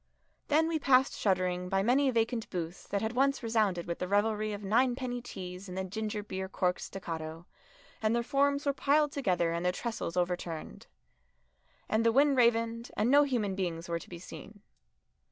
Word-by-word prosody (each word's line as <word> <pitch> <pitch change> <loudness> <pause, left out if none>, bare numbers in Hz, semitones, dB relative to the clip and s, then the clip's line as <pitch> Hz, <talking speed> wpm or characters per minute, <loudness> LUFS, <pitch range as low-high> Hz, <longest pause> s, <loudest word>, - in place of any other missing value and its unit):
Then 315 +2 +3
we 325 -1 0
passed 265 -1 +4
shuddering 180 -2 0
by 195 +1 +1
many 265 +5 +3
vacant 230 -1 0
booths 175 -1 -5
that 200 +1 -1
had 220 +2 -1
once 275 +1 +2
resounded 215 -6 +1
with 170 - -4
the 180 - -2
revelry 215 +2 +1
of 205 0 -6
ninepenny 245 +3 +1
teas 185 -4 -8
and 180 - -6
the 190 - -1
gingerbeer 205 -1 -4
cork's 180 -1 0
staccato, 165 -3 -6 0.6
and 220 +1 +2
their 235 - +1
forms 280 +3 +1
were 280 - +2
piled 295 +2 +2
together 180 -12 +1
and 170 +1 -2
their 180 - +2
trestles 210 -4 -4
overturned. 175 -2 -3 1.0
And 220 +1 +1
the 230 - +4
wind 280 +3 +4
ravened, 230 -1 +2
and 225 +4 +2
no 285 +1 +7
human 230 -8 -1
beings 170 -3 -3
were 170 -1 -2
to - - -13
be 175 - -7
seen. 205 +4 -11
215 Hz, 175 wpm, -31 LUFS, 180-245 Hz, 1.0 s, no